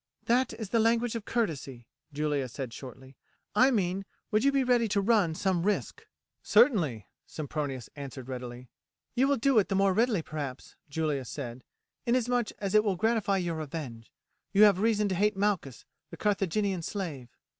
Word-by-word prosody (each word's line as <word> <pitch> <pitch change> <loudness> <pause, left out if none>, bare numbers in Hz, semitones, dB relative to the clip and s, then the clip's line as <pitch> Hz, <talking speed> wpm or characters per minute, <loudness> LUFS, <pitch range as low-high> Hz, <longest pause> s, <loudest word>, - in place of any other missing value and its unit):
"That 250 +3 +2
is 220 -4 -6
the 230 - +2
language 230 +1 +2
of 230 -3 -5
courtesy," 140 - -2 0.3
Julia 145 -2 -1
said 125 0 -6
shortly; 130 +1 -10 0.4
"I 255 +6 +5
mean 195 -5 0 0.3
would 215 0 +2
you 280 - +4
be 275 -1 +2
ready 245 -2 +3
to 205 -1 +1
run 200 -6 +2
some 185 -1 0
risk?" 205 +3 -2 0.3
"Certainly," 180 - +3 0.2
Sempronius 145 -5 -4
answered 135 -3 -8
readily. 125 -1 -7 0.5
"You 255 +2 +3
will 280 0 +2
do 265 0 +4
it 200 - 0
the 195 - 0
more 195 0 +3
readily, 220 -4 +2
perhaps," 145 -5 -6
Julia 150 -2 -1
said, 125 -1 -7 0.4
"inasmuch 245 -1 +1
as 200 -1 -3
it 215 0 +6
will 200 -3 +1
gratify 215 -1 +1
your 170 -3 -2
revenge. 135 -7 -6 0.4
You 205 +1 +6
have 200 -3 +6
reason 210 -1 +2
to - - 0
hate 205 +2 +1
Malchus, 195 - -1 0.2
the - - -10
Carthaginian 200 -2 0
slave." 160 - -5
195 Hz, 165 wpm, -29 LUFS, 140-220 Hz, 0.5 s, it